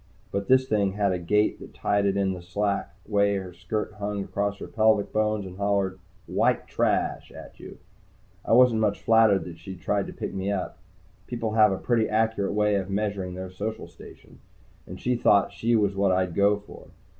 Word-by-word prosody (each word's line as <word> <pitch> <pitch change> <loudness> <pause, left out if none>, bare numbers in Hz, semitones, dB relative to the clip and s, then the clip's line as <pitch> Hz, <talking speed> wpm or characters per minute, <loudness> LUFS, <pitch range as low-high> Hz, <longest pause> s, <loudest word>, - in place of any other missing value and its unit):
But 100 0 -3
this 130 0 +4
thing 100 -4 +1
had 100 -1 +1
a 90 - -1
gait 105 +5 +1
that - - -12
tied 100 0 +1
in 100 -1 +1
with 90 -1 -9
the - - -22
slack 100 +1 -1
way 100 -1 +2
her 95 -2 -5
skirt 105 +4 -4
hung 100 -1 -3
across 100 +1 -2
her - - -7
pelvic 110 -2 +2
bones 110 -1 0
and 90 0 -9
hollered 100 -2 0 0.3
"White - - +1
Trash!" - - -1
at - - -12
you. - - -11 0.7
I - - 0
wasn't 120 -2 +5
much 105 -2 +1
flattered 110 -3 +4
that 85 -2 -9
she 95 +3 -8
had 90 - -14
tried 100 +2 0
to - - -8
pick - - -5
me 95 +1 -2
up. 95 -3 -4 0.5
People 115 -2 -3
have 110 -2 +5
a 95 - -1
pretty 115 0 0
accurate 110 -2 0
way 105 -1 +2
of 95 -1 -3
measuring 100 -2 -2
their 95 0 -6
social 110 +4 -5
station. - - -15 0.5
And - - -9
she 125 0 0
thought 105 -4 +3
she 115 +1 +1
was 100 -3 +1
what 100 -1 +2
I'd 90 -1 0
go 100 +3 +3
for. 105 - -13
100 Hz, 200 wpm, -26 LUFS, 95-110 Hz, 0.7 s, wasn't